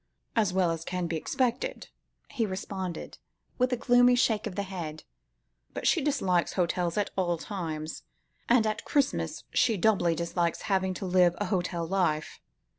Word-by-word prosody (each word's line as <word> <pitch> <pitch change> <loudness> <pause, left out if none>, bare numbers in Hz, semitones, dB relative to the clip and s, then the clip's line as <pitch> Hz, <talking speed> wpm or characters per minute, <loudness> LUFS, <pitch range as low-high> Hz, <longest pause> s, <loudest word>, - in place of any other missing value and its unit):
"As 215 -5 +3
well 180 -2 +2
as 165 -1 -4
can 180 +1 -2
be 165 0 -2
expected," 250 - -1 0.4
he 225 -3 0
responded, 190 -2 -5 0.4
with 250 +1 +2
a 250 - +1
gloomy 245 +1 +5
shake 225 -2 +2
of 190 - -7
the 200 - -1
head, 170 -5 -6 0.7
"but - - -4
she 340 - +4
dislikes 195 - +1
hotels 175 -1 0
at 205 -1 0
all 175 -3 +1
times, 160 -5 -5 0.5
and 235 -2 +5
at 215 -1 -1
Christmas 280 -1 0
she 230 -4 +3
doubly 180 -4 +3
dislikes 170 0 -1
having 190 -2 0
to 190 - -5
live 180 -1 +4
a 205 - -1
hotel 180 -3 -1
life. 165 -4 0
185 Hz, 160 wpm, -28 LUFS, 170-220 Hz, 0.7 s, gloomy